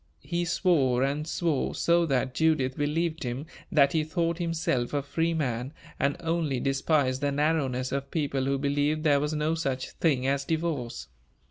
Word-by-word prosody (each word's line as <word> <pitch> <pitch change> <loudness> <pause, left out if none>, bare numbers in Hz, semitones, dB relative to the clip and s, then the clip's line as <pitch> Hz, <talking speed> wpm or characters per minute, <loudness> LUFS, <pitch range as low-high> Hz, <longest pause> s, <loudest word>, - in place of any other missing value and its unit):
He 175 0 -1
swore 145 -8 +2
and 145 +3 -1
swore 165 -5 -1
so 170 0 +3
that 130 -2 0
Judith 155 -5 +2
believed 160 +3 -1
him 125 +3 -3 0.3
that 140 -5 +4
he 160 -1 +2
thought 170 +1 -1
himself 160 -7 -1
a 140 - 0
free 165 +4 0
man, 130 -2 -2 0.3
and 140 0 +1
only 165 -5 0
despised 135 0 +1
the 145 0 +1
narrowness 140 -4 0
of 140 0 -3
people 140 -4 -1
who 140 0 +1
believed 145 +2 0
there 145 -3 +4
was 150 +2 -1
no 150 +1 0
such 135 -5 -2
thing 135 -6 +1
as 140 +1 +1
divorce. 145 - -2
145 Hz, 165 wpm, -27 LUFS, 135-160 Hz, 0.3 s, that